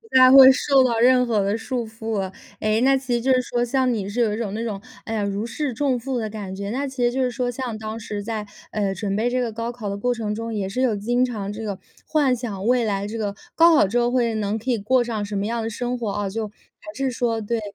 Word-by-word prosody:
太 255 0 +8
会 265 -1 +10
受 270 0 +3
到 235 -3 +1
任 250 +1 +5
何 220 -3 +2
的 200 +3 0
束 240 +1 -3
缚 225 -1 -4
了。 190 -1 -3 0.3
诶， 215 +2 +1
那 270 +1 +4
其 260 -2 -3
实 235 - +1
就 265 +2 +2
是 255 - +4
说 240 -1 -1
像 255 +1 +1
你 200 -3 -3
是 225 - -4
有 215 -3 +2
一 215 - -3
种 210 -4 -3
那 225 - -3
种， 205 -4 -4 0.2
哎 225 - -4
呀， 215 -2 0
如 200 +2 -2
释 265 +2 -3
重 265 0 0
负 260 +1 -3
的 220 -2 -2
感 205 -3 -6
觉， 200 +1 -5
那 275 +3 -2
其 260 -2 -3
实 240 - +3
就 265 +2 -1
是 250 - +2
说 245 0 -2
像 245 -3 -4
当 220 +1 -5
时 210 -2 -5
在， 215 -1 -4 0.3
诶， 200 -2 -1
准 195 0 -2
备 230 +3 +1
这 255 - 0
个 235 -2 -2
高 230 +2 -4
考 225 -4 -6
的 200 - -3
过 245 +4 0
程 220 -3 -3
中， 230 +1 -4
也 200 -3 -2
是 250 +7 -2
有 240 -5 +2
经 240 +5 +1
常 210 -5 -3
这 220 +2 -6
个 205 -3 -4 0.3
幻 285 -5 +2
想 220 -5 -5
未 245 0 +3
来 200 -2 -1
这 225 +2 -5
个 205 -2 -2 0.2
高 335 0 +6
考 245 - +5
之 240 +5 +1
后， 240 0 +1
会 240 -2 +1
能 215 0 -1
可 245 +4 -2
以 235 - +1
过 245 +5 +2
上 225 -3 -3
什 205 0 -5
么 200 +1 -1
样 230 +1 -2
的 225 - -2
生 245 +2 -3
活， 230 -4 -3
哦， 200 -1 -2
就 220 +2 -3
还 215 +8 -15
是 270 -1 -1
说 230 -2 -1
对， 225 +2 -2
230 Hz, 305 characters per minute, -23 LUFS, 210-250 Hz, 0.3 s, 会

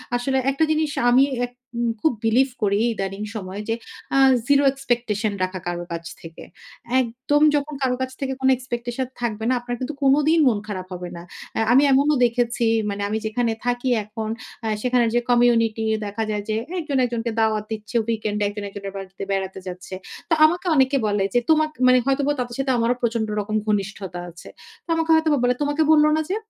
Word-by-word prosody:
আসলে 265 +2 0
একটা 275 +4 0
জিনিস 310 -1 +1 0.2
আমি 250 +2 +6 0.2
আ - - +2 0.3
উম 235 0 +1
খুব 315 - +3
বিলিভ 250 +5 +3
করি 205 0 +2
ইদানিং 195 -1 -4
সময়, 195 -1 -5
যে 225 - +1 0.4
আ - - +4 0.3
জিরো 285 0 +4
এক্সপেকটেশন 235 -6 -1
রাখা 185 0 -3
কারো 175 0 -3
কাছ 170 0 -5 0.2
থেকে। 165 0 -11 0.6
একদম 255 +5 -1
যখন 290 +1 -1
কারো 250 -1 +2
কাছ 260 - -2
থেকে 265 -1 -2
কোন 265 - +3
এক্সপেকটেশন 245 0 -4
থাকবে 220 -2 -2
না, 255 - +3
আপনার 245 0 -4
কিন্তু 260 +4 -4
কোনদিন 300 +4 +4
মন 220 -5 +2
খারাপ 185 -3 -5
হবে 180 0 -6
না। - - -8 0.4
আ - - +1
আমি 265 +3 +6
এমনও 285 +3 +4
দেখেছি, 235 0 0 0.2
মানে 200 0 -4
আমি 220 - 0
যেখানে 230 +1 0
থাকি 245 +1 0 0.2
এখন, 220 +1 -5 0.4
আ - - 0
সেখানে 250 -1 +2
যে - - +5
কমিউনিটি 230 -2 +3 0.2
দেখা 205 +2 -3
যায় 210 -1 -2
যে 215 - +1 0.2
একজন 295 -4 -2
একজনকে 235 -1 -2
দাওয়াত 220 -1 +1
দিচ্ছে, 215 +2 -6
উইকেন্ড 215 -2 -1
এ - - +2
একজন 205 0 -6
একজনের 195 0 -7
বাড়িতে 195 0 -8
বেড়াতে 190 -1 -2
যাচ্ছে। 185 +1 -7 0.3
তো - - +3
আমাকে 350 +4 +1
অনেকে 270 0 +3
বলে 205 -1 +1
যে 245 - +4
তোমকে 310 -1 +2
মানে 255 - +6
হয়তোবা 275 +1 +1
তাদের 245 -1 -3
সাথে 270 -1 +1
আমারও 235 +1 +2
প্রচন্ড 230 -2 0
রকম 210 +1 -3
ঘনিষ্ঠতা 195 -3 -2
আছে। 170 - -13 0.4
তো - - -27
আমাকে 325 0 -1
হয়তোবা 315 -2 +3
বলে 245 0 +3
"তোমাকে 290 +2 +1
বলল 300 -1 +6
না 315 - +1
যে?" 390 - 0
240 Hz, 195 wpm, -22 LUFS, 210-270 Hz, 0.6 s, আমি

